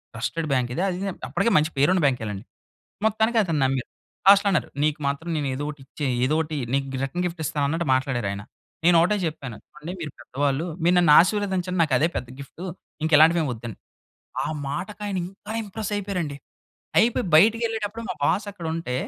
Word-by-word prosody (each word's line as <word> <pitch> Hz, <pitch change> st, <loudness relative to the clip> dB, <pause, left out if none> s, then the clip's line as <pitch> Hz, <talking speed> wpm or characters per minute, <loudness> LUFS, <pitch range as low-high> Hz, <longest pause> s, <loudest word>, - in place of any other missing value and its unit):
Trusted 155 Hz, +8 st, -2 dB
bank 125 Hz, -2 st, +1 dB
ఇది. -, -, -1 dB
అది 180 Hz, -, -3 dB
ఇది, 195 Hz, -, -1 dB, 0.2 s
అప్పటికే, 235 Hz, -, +1 dB
మంచి 155 Hz, +2 st, -1 dB
పేరు 145 Hz, -, +5 dB
ఉన్న 180 Hz, -, +2 dB
బ్యాంకే 125 Hz, -5 st, +1 dB
లెండి. 100 Hz, +2 st, -7 dB, 0.6 s
మొత్తానికి 220 Hz, +2 st, +2 dB
అతను 160 Hz, -5 st, -1 dB
నమ్మారు. 130 Hz, -1 st, -1 dB, 0.4 s
లాస్ట్‌లో 200 Hz, +1 st, +7 dB
అన్నారు 170 Hz, -, +1 dB, 0.2 s
"నీకు 155 Hz, 0 st, 0 dB
మాత్రం 140 Hz, +4 st, -4 dB
నేను 145 Hz, -2 st, -1 dB
ఏదో 140 Hz, +3 st, -3 dB
ఒకటి 150 Hz, -1 st, -11 dB
ఇచ్చే 145 Hz, +1 st, -4 dB, 0.2 s
ఏదో 150 Hz, -, +1 dB
ఒకటి 155 Hz, -1 st, -3 dB, 0.2 s
నీకు 135 Hz, 0 st, +1 dB, 0.2 s
రిటర్న్ 175 Hz, +7 st, -3 dB
గిఫ్ట్ 170 Hz, -1 st, -5 dB
ఇస్తాను" 150 Hz, -1 st, -1 dB
అన్నట్టు 165 Hz, +2 st, -1 dB
మాట్లాడారు, 130 Hz, -5 st, -1 dB
ఆయన. 100 Hz, +1 st, -5 dB, 0.4 s
నేను 175 Hz, 0 st, +6 dB
ఒకటే 180 Hz, +5 st, +3 dB
చెప్పాను. 135 Hz, -7 st, -5 dB, 0.2 s
చూడండి 170 Hz, +1 st, -8 dB
మీరు 150 Hz, -4 st, -5 dB
పెద్దవాళ్ళు, 140 Hz, +4 st, -1 dB, 0.2 s
మీరు 175 Hz, -, +4 dB
నన్ను 170 Hz, -4 st, +4 dB
ఆశీర్వదించండి. 185 Hz, -1 st, 0 dB
నాకు 150 Hz, -5 st, +2 dB
అదే 155 Hz, -, +3 dB
పెద్ద 125 Hz, -, -4 dB
గిఫ్టు 140 Hz, +5 st, -10 dB, 0.4 s
ఇంకెలాంటివేమి 160 Hz, 0 st, +5 dB
వద్దండి. 115 Hz, -2 st, -7 dB, 0.7 s
ఆ -, -, -2 dB, 0.2 s
మాటకి 190 Hz, +9 st, -5 dB
ఆయన, 195 Hz, -2 st, -2 dB
ఇంకా 195 Hz, +3 st, -9 dB
ఇంప్రెస్ 210 Hz, 0 st, -5 dB
అయిపోయారండి. 185 Hz, -8 st, -3 dB, 0.6 s
అయిపోయి, 225 Hz, 0 st, +3 dB
బయటికి 225 Hz, +7 st, +5 dB
ఎళ్ళేటప్పుడు 225 Hz, 0 st, -4 dB
మా -, -, -2 dB
బాస్ 200 Hz, +7 st, +1 dB
అక్కడ 175 Hz, -4 st, -7 dB
ఉంటే, 165 Hz, -7 st, -3 dB
160 Hz, 185 wpm, -24 LUFS, 140-190 Hz, 0.7 s, లాస్ట్‌లో